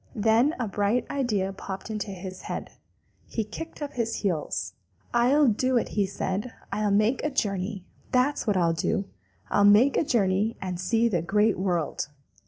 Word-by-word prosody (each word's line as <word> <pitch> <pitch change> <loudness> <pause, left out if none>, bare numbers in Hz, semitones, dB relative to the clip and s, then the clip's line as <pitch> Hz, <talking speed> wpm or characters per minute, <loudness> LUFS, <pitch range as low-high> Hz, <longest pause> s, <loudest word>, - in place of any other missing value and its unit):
Then 225 +7 +3
a 240 - -1
bright 205 +4 +1
idea 210 -9 0
popped 195 +2 -6
into 210 -1 -3
his 185 -1 -7
head. - - -5 0.6
He 225 - -2
kicked 320 +8 -7
up 290 - -5
his 230 -2 -1
heels. 170 -6 -1 0.4
"I'll 255 +5 +4
do 255 +3 +2
it," - - 0 0.2
said 190 +1 -2
he. - - -6 0.2
"I'll 210 +1 +1
make 215 +5 +2
a 300 - +1
journey! 195 -6 -2 0.3
That's 255 +1 +1
what 205 -3 +2
I'll 170 -2 +3
do! 195 +5 0 0.5
I'll 205 - +4
make 210 +7 +6
a - - +3
journey 215 -4 +1
and 185 -2 -4
see 225 +5 +2
the 180 -8 0
Great 210 +4 +2
World. 175 -7 -1
210 Hz, 170 wpm, -26 LUFS, 190-240 Hz, 0.6 s, make